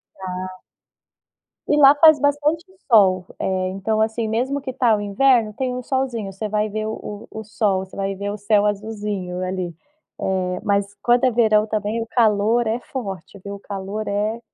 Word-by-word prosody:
Dá. 185 0 -6 1.1
E 295 - +2
lá 280 0 +8
faz 305 -1 +6
bastante 290 +3 +1 0.3
sol, 185 -4 +5 0.2
eh, 185 -1 0
então 200 +3 -2
assim, 220 0 -1
mesmo 260 +6 -1
que 265 -1 -5
tá 245 -3 +2
o 205 - -1
inverno, 215 +1 +2
tem 255 0 -2
um 250 - -4
solzinho, 245 -6 -2
você 195 +3 -5
vai 210 +1 0
ver 215 +1 -3
o 215 -1 -6
o 220 - -6
o - - -7
sol, 200 -3 0
você - - -15
vai 195 0 -2
ver 200 +1 -4
o 205 - -4
céu 210 0 +2
azulzinho 205 -3 -3
ali, 185 -2 -3 0.5
eh, 180 -1 -1
mas 200 0 0
quando 240 +1 +3
é 255 - +5
verão 220 -2 +3
também 215 +1 -2
o - - -5
calor 225 0 +2
é 225 +2 0
forte 200 -7 -7
viu, 200 0 -6
o - - -8
calor 200 +2 -5
é 210 +3 -1
210 Hz, 185 wpm, -21 LUFS, 195-235 Hz, 1.1 s, lá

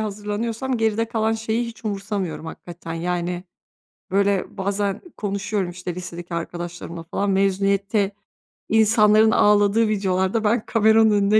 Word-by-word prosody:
hazırlanıyorsam 220 +4 -2
geride 225 0 +1
kalan 225 -1 0
şeyi 225 +1 -1
hiç 230 0 -11
umursamıyorum 195 -5 -3
hakikaten, 165 0 -8
yani, 175 +1 -2 0.7
böyle, 200 0 +1
bazen 200 +1 -1 0.2
konuşuyorum, 200 -2 -2
işte, 175 0 -6
lisedeki 175 -1 -7
arkadaşlarımla 170 0 -5
falan, 195 +4 -2
mezuniyette 195 +1 +1 0.6
insanların 220 0 +5
ağladığı 210 0 +4
videolarda 195 +1 0
ben 220 +1 +1
kameranın 220 0 +4
önüne 205 +1 +4
200 Hz, 115 wpm, -22 LUFS, 185-220 Hz, 0.7 s, insanların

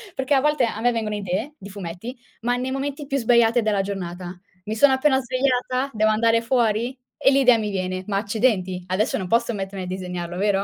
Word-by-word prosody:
perché 265 +2 0
a 270 - +4
volte 295 -3 +2
a 220 -1 -4
me 245 +1 +3
vengono 220 -3 -2
idee 205 +8 -3
di 200 - -10
fumetti, 195 +5 -7 0.2
ma 245 +1 +1
nei 255 +1 -3
momenti 280 +2 -3
più 275 0 -1
sbagliati 235 -1 +4
della 210 -3 +1
giornata. 180 -2 -6 0.3
Mi 215 - -3
sono 265 +4 +5
appena 265 0 +3
svegliata, 255 +1 0
devo 215 0 +3
andare 230 +1 +3
fuori, 235 +1 0 0.2
e 270 - +4
l'idea 265 -3 +5
mi 215 -1 -2
viene: 185 -1 -3
"Ma 200 -2 0
accidenti, 200 -4 0
adesso 185 +4 0
non 190 - -4
posso 235 +3 +1
mettermi 195 -1 -5
a - - -7
disegnarlo, 180 -1 -5
vero?" 200 0 +1
225 Hz, 205 wpm, -23 LUFS, 195-255 Hz, 0.3 s, sono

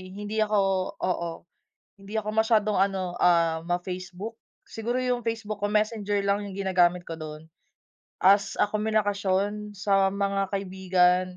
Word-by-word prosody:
hindi 210 +1 -4
ako, 210 -1 +2 0.4
oo, 170 -2 -1 0.7
hindi 195 +2 -12
ako 210 0 -5
masyadong 220 -2 +3
ano, 190 -2 0
ah, 165 -2 +3
ma-Facebook. 185 +4 -4 0.3
Siguro 240 +3 -2
yung 250 -2 -1
Facebook 220 -2 -3
ko - - +3
Messenger 210 -1 +1
lang 200 +1 +1
yung 195 -1 -7
ginagamit 180 -2 +2
ko 165 - -4
dun 155 0 -8 0.7
as 200 +2 +4
a - - +4
komunikasyon 205 -1 0
sa 195 -1 +2
mga 200 0 0
kaibigan, 185 -2 +2
200 Hz, 130 wpm, -26 LUFS, 185-210 Hz, 0.7 s, as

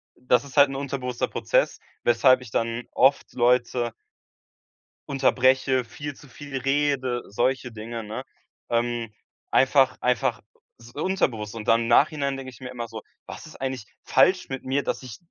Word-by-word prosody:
das 125 +1 +2
ist 140 +1 -13
halt 140 -1 +7
'n 135 - -5
unterbewusster 130 -3 -3
Prozess, - - 0 0.2
weshalb 125 +2 +4
ich 120 -4 -11
dann 115 +1 -1
oft 135 +2 +3
Leute 120 -1 +2 1.2
unterbreche, 130 -1 +3
viel 145 +4 -7
zu 145 - -16
viel 145 -1 -9
rede, 135 -2 0
solche 125 +3 -1
Dinge, 115 +1 -6
ne? 105 +1 -6 0.5
Ähm, 120 -1 -1 0.4
einfach 135 -1 +4
einfach 125 0 +1 0.4
es 115 - -17
ist - - -20
unterbewusst. 125 - -1
Und 110 - -7
dann 115 +1 +4
im 115 - -2
Nachhinein 140 +2 +3
denke 130 -1 -7
ich - - -16
mir 125 - -6
immer 120 -2 -6
so: 110 -1 -8 0.2
„Was - - -9
ist - - -13
eigentlich 130 -5 -4 0.2
falsch 180 +7 +3
mit 135 -1 -5
mir, 135 +2 0
dass - - -2
ich“ 125 -5 -9
125 Hz, 165 wpm, -25 LUFS, 120-135 Hz, 1.2 s, halt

